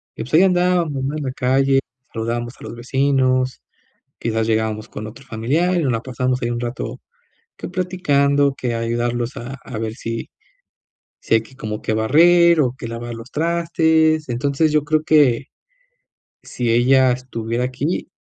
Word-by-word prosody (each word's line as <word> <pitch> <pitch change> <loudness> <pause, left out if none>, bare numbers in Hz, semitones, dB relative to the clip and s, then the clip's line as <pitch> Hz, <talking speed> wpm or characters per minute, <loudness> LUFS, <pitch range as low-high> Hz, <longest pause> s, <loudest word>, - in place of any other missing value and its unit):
Y, - - -5
pues, 125 - -12
ahí 170 +4 +7
andábamos, 175 -6 +2
¿no?, 140 +3 -2
en 150 - -4
la 130 - -2
calle. 135 +1 +2 0.3
Saludábamos 120 +1 -3
a - - -12
los - - -7
vecinos. 130 +1 +1 0.6
Quizás 110 -1 -1
llegábamos 110 0 -1
con 110 +1 -7
otro 130 +6 -11
familiar 140 +10 0
y 170 - +1
nos 130 - +1
la 115 - -2
pasamos 125 0 -1
ahí 120 - -1
un 120 0 -2
rato 120 +2 -5 0.6
que - - -7
platicando 145 -7 +1
que 120 -3 -3
ayudarlos 120 +1 -2
a 125 +3 -6
a 120 -5 -6
ver 110 0 -3
si 115 -2 -5 0.9
si - - +2
hay 110 - +3
que 130 - -18
como 110 -4 -5
que 110 - -1
barrer 170 +8 +5
o 125 -2 +1
que 130 -4 -7
lavar 120 +1 -6
los 115 +2 -9
trastes. 160 -1 +2
Entonces, 140 +5 +1
yo 150 -1 +2
creo 155 +1 +1
que 145 -5 +3 1.0
si 120 -2 -3
ella 130 +2 +4
estuviera 120 -1 -3
aquí, 140 +8 -3
130 Hz, 170 wpm, -20 LUFS, 120-150 Hz, 1.0 s, ahí